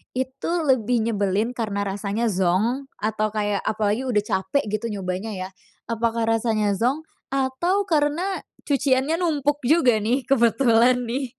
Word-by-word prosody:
itu 260 +5 -3
lebih 245 -4 +2
nyebelin 205 +3 0
karena 210 -4 -2
rasanya 205 +3 -2
zonk 200 +9 0
atau 215 0 -1
kayak 205 -1 0
apalagi 215 +4 0
udah 210 -4 +1
capek 190 +8 0
gitu 215 +2 -2
nyobanya 195 +1 -4
ya, 185 0 -5 0.4
apakah 230 0 0
rasanya 225 -2 +1
zonk 270 +7 0 0.3
atau 275 +9 0
karena 325 +4 0 0.3
cuciannya 275 +1 +1
numpuk 295 -4 0
juga 255 -8 +4
nih 245 +5 0
kebetulan 245 -1 +3
nih? 255 +2 -4
235 Hz, 130 wpm, -23 LUFS, 210-270 Hz, 0.4 s, juga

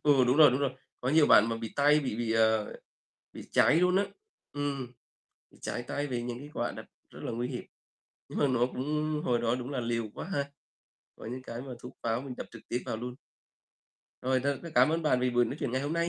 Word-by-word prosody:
Ừ, 140 -4 +5
đúng 125 +3 +3
rồi, 150 -3 +9
đúng 130 +3 0
rồi. 140 - +1 0.3
Có 125 - -2
nhiều 150 +2 +5
bạn 110 - +7
mà 115 - -1
bị 115 -1 -6
tay 145 +1 +5
bị 130 -6 -3
bị, 115 -1 -1
ờ, 110 -1 +3 0.6
bị - - -8
cháy 150 - +5
luôn 180 +2 +4
á. 200 - +4 0.5
Ừm. 140 -4 -3 0.6
Ừ, - - -21
cháy 120 - -3
tay 145 0 -1
vì 125 -3 -2
những 120 0 -4
cái 145 +2 -10
quả 120 - -1
đặt - - -9 0.2
rất - - -12
là - - -3
nguy 120 +2 -2
hiểm, 125 -2 -5 0.6
nhưng - - -5
mà 145 - +4
nó 125 -2 +3
cũng 150 +4 -2
hồi 120 -1 +2
đó 120 0 +1
đúng 125 +2 -5
là 135 - -2
liều 115 -2 -1
quá - - -6
ha, 140 -5 +1 0.7
có - - -11
những 125 +3 -5
cái 115 -1 -6
mà 130 -1 -7
thuốc 125 - -11
pháo 115 +1 0
mình 130 -2 -7
đập - - -6
trực 115 - -11
tiếp 120 - -1
vào 110 - -3
luôn. 125 +2 -5 1.1
Rồi 130 0 +2
thôi, 140 -1 +1
rất 170 - -7
cám 125 +3 +6
ơn 165 +1 0
bạn 125 -5 +3
vì 125 - +2
buổi 120 0 +4
nói - - -4
chuyện - - -1
ngày 130 - +1
hôm 145 +3 -2
nay 170 0 +1
125 Hz, 250 wpm, -30 LUFS, 120-145 Hz, 1.1 s, rồi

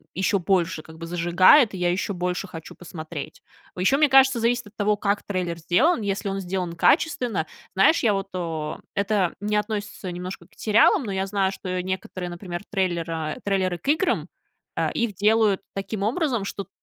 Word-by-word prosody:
еще 195 +3 +1
больше 175 -3 0
как 160 +1 -14
бы 165 - -7
зажигает, 175 - +5
и - - -5
я 175 -1 +1
еще 190 +3 -2
больше 180 +1 -2
хочу 165 -3 -10
посмотреть. 155 -3 -8 0.3
О - - -8
еще, 270 +9 +3
мне 300 0 +4
кажется, 265 -2 +6
зависит 240 0 0
от 205 - -18
того, 210 0 +1
как 200 0 0
трейлер 180 -4 -3
сделан. 225 - +2
Если 200 0 -2
он 195 0 -2
сделан 180 -2 -3
качественно 245 - +2 0.3
знаешь, 195 - +5
я 220 -3 +4
вот, 195 0 -2
а 185 - -3 0.4
а, - - -19
это 200 -3 +1
не 210 +1 -1
относится 210 -2 -3
немножко 180 +2 -7
к - - -48
сериалам, 220 +5 +4
но 210 - -4
я 190 0 -1
знаю, 195 -1 +1
что 185 -1 -4
некоторые, 185 -1 -4
например, 175 0 -6
трейлера 165 -5 -2
трейлеры 190 -3 0
к 175 - -15
играм, 315 +5 +1 0.5
а, - - 0
их 235 -3 -1
делают 210 0 +3
таким 195 +1 -4
образом, 240 - 0
что 200 - -4
т - - -42
195 Hz, 190 wpm, -24 LUFS, 175-215 Hz, 0.5 s, кажется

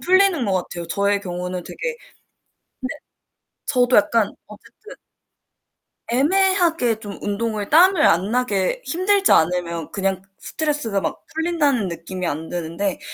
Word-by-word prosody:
풀리는 375 -5 +3
것 200 - 0
같아요. 175 -2 -3
저의 200 +3 +1
경우는 180 -1 -4
되게 - - -11 0.2
근데 - - -29 1.7
저도 250 -2 +3
약간 215 +1 +3 0.2
어쨌든 210 - -14 1.2
애매하게 330 - +2
좀 205 -3 -8
운동을 210 0 -2
땀을 350 +2 +5
안 185 +5 +3
나게 245 - 0
힘들지 390 +3 +2
않으면 170 -1 +1
그냥 195 -1 -1 0.2
스트레스가 290 -11 -2
막 205 - -4
풀린다는 305 - +1
느낌이 175 +2 -5
안 160 +1 -4
드는데 175 +3 -3
210 Hz, 280 characters per minute, -21 LUFS, -, 1.7 s, 땀을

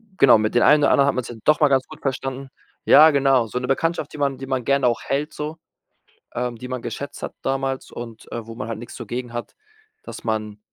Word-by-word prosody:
äh, - - -29
genau, 125 -5 +7
mit 110 0 -1
den 120 - +4
einen 150 0 +6
oder - - +4
anderen 140 0 +4
hat - - +1
man 130 - -2
sich 120 - -8
dann 115 - -14
doch 150 0 +4
mal 150 - +5
ganz 135 -1 +2
gut 155 - -13
verstanden. 135 0 -3 0.4
Ja, 155 +1 +8
genau, 135 -4 +3
so 125 - -3
'ne 125 - -4
Bekanntschaft, 165 +5 -1
die 150 - -9
man 140 -2 0
die 135 - -7
man 130 -2 -2
gern 140 -1 +2
auch 120 -2 +1
hält, 145 +3 -2
so, 150 +2 -5 0.8
ähm, 125 -1 -2
die 125 +3 -8
man 130 -1 -4
geschätzt 140 - -6
hat - - -5
damals 135 0 -2
und, 115 -2 -9
äh, 115 -2 -5
wo 115 - -8
man 130 - -5
halt 115 -1 -4
nix 120 - -10
so 120 - -8
gegen 120 +1 -5
hat, 120 0 -6 0.5
dass - - -9
man 110 -2 -2
130 Hz, 255 wpm, -22 LUFS, 120-140 Hz, 0.8 s, Ja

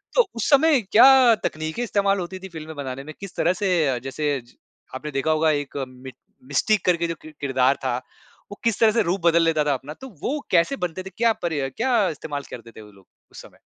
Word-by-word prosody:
तो - - +5
उस 230 - -2
समय 290 -1 +5
क्या 240 +3 +6
तकनीकें 155 +8 -3
इस्तेमाल 200 -3 +1
होती 185 +1 -6
थी 190 +1 -9
फ़िल्में 160 -2 -9
बनाने 135 -2 -6
में, 155 +2 -9
किस 195 -2 -9
तरह 175 +3 +2
से 195 +1 -2 0.2
अ, 130 -2 0
जैसे 140 +2 -2
ज 120 - -22 0.4
आपने 150 +3 -6
देखा 135 +3 0
होगा 155 0 +2
एक 145 0 -9
मि 130 +1 -11 0.4
मिस्टिक 195 +8 +1
करके 170 -2 +2
जो 165 - -4
किर 155 - -12
किरदार 130 -1 +2
था 125 -2 0 0.5
वो 205 - -9
किस 230 -3 0
तरह 225 -1 +5
से 230 +1 +2
रूप 190 +2 -1
बदल 170 0 +4
लेता 160 -2 +2
था 145 -1 +1
अपना, 135 +3 -6
तो 265 - -11 0.2
वो 295 +3 -1
कैसे 170 +9 +3
बनते 180 -2 -4
थे? 190 - -8
क्या 230 0 +3
पर 170 -2 -1
या 140 -3 -2
क्या 230 - +1
इस्तेमाल 145 -2 -5
करते 115 -1 -10
थे 110 - -13
वो 105 -1 -14
लोग, 95 -2 -21 0.3
उस - - -11
समय? - - -17
165 Hz, 230 wpm, -23 LUFS, 140-205 Hz, 0.5 s, क्या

